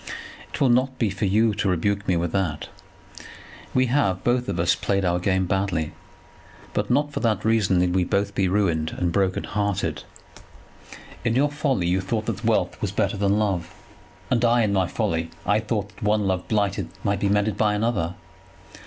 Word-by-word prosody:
"It - - -6
will 135 - +4
not 130 +2 +2
be 110 -5 +1
for 100 +2 -2
you 110 +3 +3
to 105 -1 0
rebuke 100 +3 0
me 90 - +2
with 85 0 -1
that. 90 -7 -2 1.0
We 130 0 +3
have, 120 -8 +1
both 125 0 +1
of 85 - -2
us, 85 - +3
played 100 -1 0
our 90 0 +1
game 95 0 +1
badly, 95 -5 -1 0.8
but - - -1
not 145 +3 +2
for - - -2
that 110 -4 0
reason 110 -5 +3
need 90 0 +2
we 95 -1 +2
both 100 +3 0
be 95 -1 +1
ruined 85 -5 0
and 90 -1 0
broken 95 0 0
hearted. 100 -2 -2 1.2
In 115 -1 +1
your 145 +3 +2
folly 145 - 0
you 90 +2 +1
thought 110 +3 -2
that 110 -2 -4
wealth 115 -1 0
was - - -1
better - - 0
than 100 0 +1
love; 95 -5 -1 0.6
and 125 -2 +2
I, 120 0 +4
in 105 -2 +1
my 95 -2 +2
folly, 80 0 -1 0.2
I 105 +3 +3
thought 105 -2 -2
that 105 +3 -19
one 105 -1 +1
love 95 -1 -1
blighted 105 -3 0
might 100 0 0
be 100 - +1
mended 105 0 +1
by 105 0 +2
another. 105 -6 -1
100 Hz, 190 wpm, -24 LUFS, 95-110 Hz, 1.2 s, will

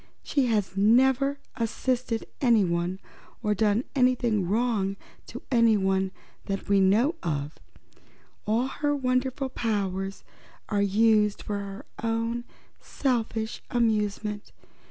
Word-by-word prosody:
She 275 -3 +1
has 210 -5 0
never 265 +7 +4 0.2
assisted 235 0 -1 0.2
anyone, 185 -7 +2 0.5
or 210 - +2
done 210 +2 +2
wrong 225 -5 +1 0.3
to - - -9
anyone, 195 -5 +3 0.3
that 195 0 -4
we 200 -1 +4
know 215 - +4
of. 150 -3 -3 0.9
All 225 +4 +2
her 290 +2 -1
wonderful 260 0 0
powers 195 -5 -2 0.5
are 205 -2 +1
used 210 +1 +3
for 205 -1 -3
her 200 0 -7 0.2
own 230 +1 -1 0.3
selfish 230 -4 -2
amusement. 210 -3 -1
220 Hz, 100 wpm, -27 LUFS, 200-245 Hz, 0.9 s, never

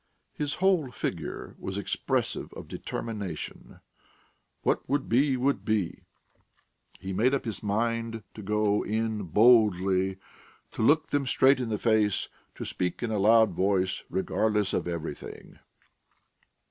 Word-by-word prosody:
His 145 0 -3
whole 185 -7 +2
figure 110 - -5
was 95 +1 -5
expressive 100 - -2
of - - -9
determination: 100 -8 -6 0.8
what - - 0
would 140 0 0
be, 130 +3 +3
would 135 +3 0
be! 105 -6 -1 1.0
He 95 0 -5
made 120 +8 +3
up 135 - -3
his 110 -4 -4
mind 115 +1 -1
to 110 - -9
go 105 0 +1
in 110 0 -1
boldly, 95 -2 +4 0.5
to - - -5
look 150 +7 +3
them 140 -2 0
straight 130 +1 +4
in 125 -3 -2
the 105 - -1
face, 110 -3 +1 0.3
to - - -6
speak 90 +5 -2
in 115 - -1
a 105 - 0
loud 110 +1 +5
voice, 95 +1 0
regardless 105 +1 0
of - - -1
everything. 85 -4 -6
110 Hz, 135 wpm, -28 LUFS, 95-120 Hz, 1.0 s, loud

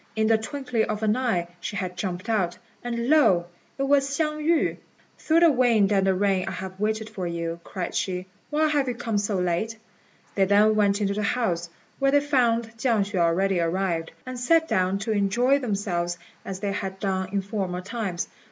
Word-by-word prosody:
In 220 0 +2
the 225 0 +4
twinkling 250 -1 -2
of 215 0 -3
an 215 0 +3
eye 225 -10 0
she 200 - -5
had 185 -2 -3
jumped 180 +2 -4
out, 190 -6 0 0.3
and 235 -1 -2
lo! 230 - +4 0.3
it 275 - -1
was 275 0 +3
Hsiang 305 +1 -1
yü. 320 +1 +1 0.4
"Through 325 +1 +3
the 335 -2 +7
wind 230 -6 +3
and 195 -1 +2
the 190 - +3
rain 195 -1 +1
I - - -3
have 190 0 -7
waited 220 +1 -1
for 195 -5 -5
you," 170 0 -3
cried 185 -3 -5
she; 180 -1 -2 0.2
"why 310 +1 +2
have 290 -3 +1
you 250 - -1
come 225 -3 -1
so 205 0 -1
late?" 180 +5 -1 0.6
They 195 - +3
then 205 +2 +5
went 205 -1 +2
into 200 -1 +1
the 210 - -2
house, 185 -6 -1 0.3
where 275 0 +3
they 285 +1 +5
found 235 -5 +1
Chiang 225 -4 +2
hsüeh 195 -2 -3
already 175 +3 +2
arrived, 170 -1 -1 0.2
and 255 -1 -6
sat 325 +6 +3
down 185 - +1
to 210 +3 -3
enjoy 235 +7 +2
themselves 195 -7 -2 0.3
as 190 -1 -6
they 200 -1 -1
had 195 -1 -4
done 190 -2 -1
in 200 -1 -1
former 190 -3 -3
times. 200 -3 -3
205 Hz, 200 wpm, -25 LUFS, 185-245 Hz, 0.6 s, the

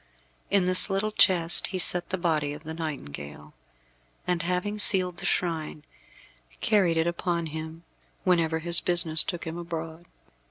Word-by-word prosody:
In 195 -2 +2
this 185 +2 +4
little 200 +2 -1
chest 175 -5 +3
he 185 - -4
set 180 -1 +2
the 190 - -2
body 155 -5 -1
of 150 +1 -11
the 160 0 -7
nightingale, 75 - -7 0.7
and 180 -2 -1
having 180 +4 -2
sealed 185 -4 +3
the 195 - -3
shrine, 160 -4 -2 0.8
carried 195 -8 +2
it 160 - +2
upon 170 0 -2
him 160 +1 -7 0.4
whenever 165 -3 +1
his 170 +1 +3
business 170 -3 +4
took 175 -3 -5
him 165 +1 -6
abroad. 165 0 -7
170 Hz, 150 wpm, -26 LUFS, 160-180 Hz, 0.8 s, this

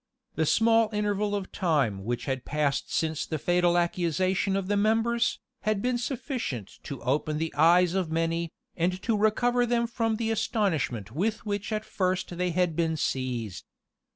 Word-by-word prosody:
The 160 0 0
small 225 +2 +4
interval 210 -1 0
of 195 -2 -4
time 135 - 0
which 120 +1 -2
had 130 -2 -2
passed 150 -2 -1
since 160 -2 0
the 155 - -3
fatal 175 +2 +2
accusation 180 +3 +1
of 195 -1 -1
the 205 - +1
members, 225 +3 +2 0.2
had 215 -1 0
been 245 +3 0
sufficient 235 - -4
to 140 -3 -6
open 150 +4 0
the 160 +1 -2
eyes 170 +4 +5
of 190 -4 0
many, 165 +1 -1 0.2
and 180 +2 0
to 230 - +1
recover 240 +4 +2
them 235 0 +2
from 225 -1 -1
the 225 0 -1
astonishment 160 - -1
with 210 - -1
which 205 0 -3
at 215 0 -2
first 185 -1 -1
they 180 +1 0
had 175 -1 +1
been 160 -1 0
seized. 120 - -2
180 Hz, 165 wpm, -27 LUFS, 155-215 Hz, 0.2 s, eyes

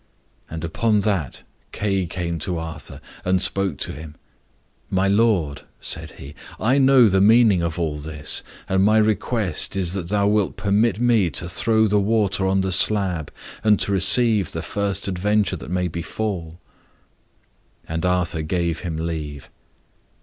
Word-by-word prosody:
And 80 0 -6
upon 105 +6 +1
that 95 - -2 0.3
Kay 95 -3 -1
came 85 -1 -4
to 90 +2 -3
Arthur, 80 -2 -8 0.2
and 90 +1 +1
spoke 95 -5 +1
to - - -4
him. 75 0 -10 0.7
"My 95 +1 +1
lord," 100 -8 +1 0.2
said - - -4
he, 70 +2 -11 0.3
"I 130 +5 +2
know 130 -3 +6
the 95 -1 +2
meaning 110 -3 +5
of 85 -1 -3
all 80 -3 -2
this, 75 -1 -3 0.3
and 95 0 +2
my 110 +2 +4
request 105 -4 0
is 90 -3 0
that 90 -4 -4
thou 100 0 +1
wilt 105 -2 0
permit 100 +1 +1
me 115 -7 +3
to 80 +3 -3
throw 110 +5 +1
the 105 -1 +2
water 100 -2 +1
on 95 0 +1
the 95 0 -2
slab, 95 -4 +1 0.3
and 105 -1 +4
to - - +1
receive 100 0 +4
the 80 - -4
first 100 -1 -2
adventure 100 +1 0
that 80 - -9
may 90 0 -1
befall." 85 0 -5 1.3
And 80 0 -3
Arthur 90 -3 0
gave 85 +1 -2
him 85 -3 -5
leave. 80 -4 -5
95 Hz, 155 wpm, -22 LUFS, 85-105 Hz, 1.3 s, know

